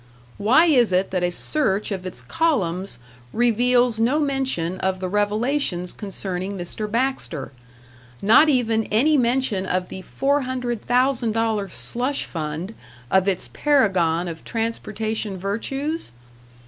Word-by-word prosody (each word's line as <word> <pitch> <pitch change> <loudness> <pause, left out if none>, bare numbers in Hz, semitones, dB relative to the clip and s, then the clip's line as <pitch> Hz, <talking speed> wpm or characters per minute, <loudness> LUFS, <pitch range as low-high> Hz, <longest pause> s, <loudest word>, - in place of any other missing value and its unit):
Why 250 +11 +5
is 250 - +4
it 185 +1 +1
that 185 -1 0
a 175 - +1
search 210 - 0
of 185 -2 -4
its 185 - -4
columns 195 - -1 0.3
reveals 245 0 +2
no 250 +7 +2
mention 265 - -1
of 190 0 -1
the 185 - -3
revelations 205 -1 0
concerning 195 -1 -5
Mr. 190 +4 -4
Baxter 230 - -2 0.7
not 230 +10 +6
even 230 -5 +2
any 280 +9 +3
mention 240 -6 +1
of 180 0 -1
the 190 - -7
$400,000 245 -4 0
slush 255 +9 -2
fund 160 +5 -5 0.4
of 190 0 +3
its 190 -2 -1
paragon 185 - +2
of 165 -1 -7
transportation 225 -2 -3
virtues? 270 - -3
220 Hz, 120 wpm, -22 LUFS, 185-255 Hz, 0.7 s, not